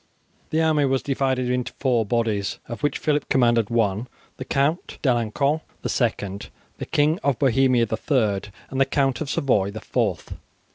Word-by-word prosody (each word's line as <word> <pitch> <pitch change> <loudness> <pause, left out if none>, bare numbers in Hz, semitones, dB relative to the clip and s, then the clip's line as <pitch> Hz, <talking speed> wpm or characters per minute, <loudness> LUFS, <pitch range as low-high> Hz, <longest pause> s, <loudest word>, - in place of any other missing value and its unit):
The 160 +1 +1
army 155 -2 +3
was 135 -1 0
divided 130 -2 0
into 125 0 -1
four 120 -5 0
bodies, 110 -3 0
of 115 -1 -7
which 145 - 0
Phillip 150 -1 0
commanded 120 -4 +3
one, 110 0 0 0.3
the 130 - -6
Count 140 +6 0
D'Alencon 135 +4 +1 0.2
the - - -2
second, 100 -5 -2 0.3
the - - -5
King 150 +4 +2
of 140 -4 +1
Bohemia 130 -2 +3
the - - -3
third, 105 -8 0 0.2
and 135 0 0
the - - +6
Count 135 -1 0
of 150 - -3
Savoy 105 -8 +1
the 110 +2 -7
fourth. 105 -6 -2
125 Hz, 170 wpm, -23 LUFS, 115-140 Hz, 0.3 s, the